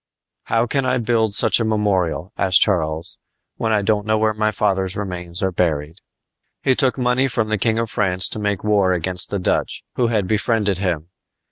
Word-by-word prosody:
"How 115 Hz, +1 st, +1 dB
can 135 Hz, +3 st, 0 dB
I 130 Hz, 0 st, +1 dB
build 110 Hz, -3 st, 0 dB
such -, -, +5 dB
a -, -, +1 dB
memorial," 100 Hz, -4 st, -1 dB
asked 95 Hz, -2 st, +3 dB
Charles, 80 Hz, -5 st, -1 dB, 0.4 s
"when 110 Hz, -, -1 dB
I 105 Hz, -2 st, +1 dB
don't 105 Hz, 0 st, +1 dB
know 110 Hz, 0 st, +2 dB
where 110 Hz, 0 st, +1 dB
my 110 Hz, 0 st, 0 dB
father's 95 Hz, -3 st, -1 dB
remains 90 Hz, -3 st, -3 dB
are 95 Hz, -, +1 dB
buried!" 80 Hz, -2 st, -1 dB, 0.7 s
He 130 Hz, -, +3 dB
took 130 Hz, 0 st, +1 dB
money 125 Hz, +1 st, +1 dB
from 115 Hz, -4 st, -1 dB
the 110 Hz, -1 st, -1 dB
King 110 Hz, +1 st, +1 dB
of 115 Hz, -1 st, -2 dB
France 95 Hz, -3 st, +1 dB
to -, -, +2 dB
make 105 Hz, -2 st, -2 dB
war 100 Hz, -3 st, +2 dB
against 90 Hz, +1 st, -1 dB
the 100 Hz, -, -2 dB
Dutch, 90 Hz, -, -1 dB
who 120 Hz, -, +2 dB
had 110 Hz, -4 st, 0 dB
befriended 105 Hz, -2 st, 0 dB
him. 85 Hz, -4 st, -2 dB
105 Hz, 195 wpm, -20 LUFS, 90-110 Hz, 0.7 s, such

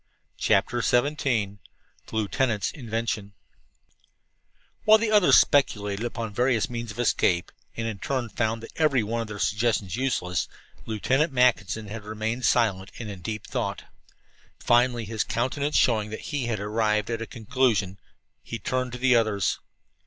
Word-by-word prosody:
CHAPTER 120 Hz, 0 st, +2 dB
XVII 140 Hz, +6 st, +2 dB
THE 105 Hz, -6 st, 0 dB, 0.6 s
LIEUTENANT'S 110 Hz, -1 st, 0 dB
INVENTION 115 Hz, -5 st, -3 dB, 1.5 s
While 215 Hz, 0 st, +7 dB
the 220 Hz, 0 st, -1 dB
others 210 Hz, -4 st, +6 dB
speculated 105 Hz, -7 st, +2 dB
upon 115 Hz, -3 st, -4 dB
various 120 Hz, 0 st, +2 dB
means 120 Hz, -1 st, -5 dB
of 110 Hz, -, -8 dB
escape, 90 Hz, -7 st, +1 dB, 0.3 s
and 115 Hz, -, -2 dB
in 110 Hz, -3 st, -4 dB
turn 130 Hz, -1 st, -2 dB
found 115 Hz, 0 st, -2 dB
every 145 Hz, -7 st, +3 dB
one 115 Hz, +2 st, -2 dB
of 115 Hz, -, -5 dB
their 105 Hz, -1 st, -7 dB
suggestions 105 Hz, -3 st, 0 dB
useless, 90 Hz, -10 st, -1 dB, 0.4 s
Lieutenant 130 Hz, +8 st, +1 dB
Mackinson 115 Hz, -4 st, +2 dB
had 105 Hz, +1 st, -7 dB
remained 110 Hz, +4 st, -3 dB
silent 100 Hz, -5 st, +2 dB
and 110 Hz, -3 st, -6 dB
in 95 Hz, -3 st, -9 dB
deep 110 Hz, +3 st, -5 dB
thought. -, -, -3 dB, 0.7 s
Finally, 120 Hz, -1 st, +2 dB
his 110 Hz, +1 st, -1 dB
countenance 140 Hz, +4 st, -1 dB
showing 110 Hz, -3 st, +2 dB
that 110 Hz, -, -7 dB
he 135 Hz, -5 st, -1 dB
had 115 Hz, -3 st, -1 dB
arrived 105 Hz, +1 st, 0 dB
at 115 Hz, 0 st, -2 dB
a 115 Hz, -, -4 dB
conclusion, 110 Hz, -5 st, 0 dB, 0.4 s
he 115 Hz, -, -6 dB
turned 125 Hz, +3 st, -2 dB
to -, -, -4 dB
the 130 Hz, 0 st, +4 dB
others. 110 Hz, -5 st, +1 dB
115 Hz, 145 wpm, -26 LUFS, 105-125 Hz, 1.5 s, While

